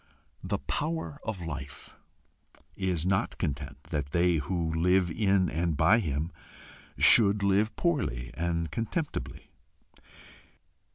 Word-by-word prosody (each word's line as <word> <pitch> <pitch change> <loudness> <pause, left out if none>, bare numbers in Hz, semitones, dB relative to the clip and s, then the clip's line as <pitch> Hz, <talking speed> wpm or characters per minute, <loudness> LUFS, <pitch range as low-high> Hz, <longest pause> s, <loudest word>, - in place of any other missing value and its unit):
The - - -1
Power 155 -1 -3
of 105 -6 -4
Life 70 -4 -8 0.8
is 90 -4 -1
not 95 +4 0
content 70 -3 -4
that 70 -3 -3
they 85 -1 +3
who 80 +1 -2
live 90 +2 +2
in 95 -2 +2
and 80 -1 -1
by 110 +9 +5
him 80 -3 -2 0.7
should 100 -2 +6
live 100 +2 +2
poorly 70 - -1
and 85 -2 -2
contemptibly. 115 - -4
85 Hz, 110 wpm, -28 LUFS, 75-100 Hz, 0.8 s, should